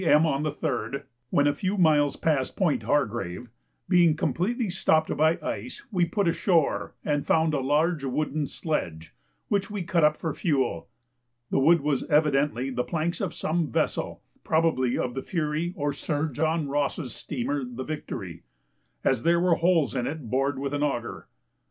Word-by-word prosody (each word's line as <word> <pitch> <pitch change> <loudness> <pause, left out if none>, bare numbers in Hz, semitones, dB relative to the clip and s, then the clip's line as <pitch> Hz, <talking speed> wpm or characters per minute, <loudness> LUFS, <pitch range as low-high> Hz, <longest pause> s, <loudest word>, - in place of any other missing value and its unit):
M. 160 -2 +5
on 140 -3 0
the 155 0 -1
3rd, 140 -5 -3 0.3
when 145 - +3
a 145 - +3
few 185 +7 -2
miles 150 -5 +4
past 145 -5 0
Point 175 -6 +1
Hargrave, 120 -11 -1 0.4
being 170 -3 +5
completely 210 +7 -1
stopped 160 -3 +2
by 160 +3 +3
ice, 120 -1 -5
we 180 -4 +2
put 200 +2 0
ashore 170 -2 +1
and 145 -1 0
found 160 -1 +2
a 145 - +1
large 150 +3 +1
wooden 145 +2 -1
sledge, 85 - -4 0.3
which 200 0 0
we 205 -3 -3
cut 170 -1 +1
up 150 0 +4
for 160 -4 -3
fuel. 135 - -1 0.6
The - - +2
wood 165 +4 +5
was 145 -2 0
evidently 145 -4 +2
the 125 -1 -1
planks 165 +3 -2
of - - -3
some 165 0 0
vessel - - -1 0.2
(probably 155 -6 +1
of 125 - -2
the 135 - -3
Fury 160 +1 -2
or 145 -1 -1
Sir 150 +2 -2
John 160 +1 0
Ross's 140 -2 -1
steamer 140 +1 -3
the 125 +1 -6
Victory) 105 - -6 0.6
as - - +2
there 170 +1 +3
were 180 0 +3
holes 165 -4 +2
in 125 -1 -1
it 145 -8 -6
bored 135 +1 +1
with 140 +1 -3
an 145 - -1
auger. 120 -5 -2
150 Hz, 170 wpm, -26 LUFS, 135-165 Hz, 0.6 s, M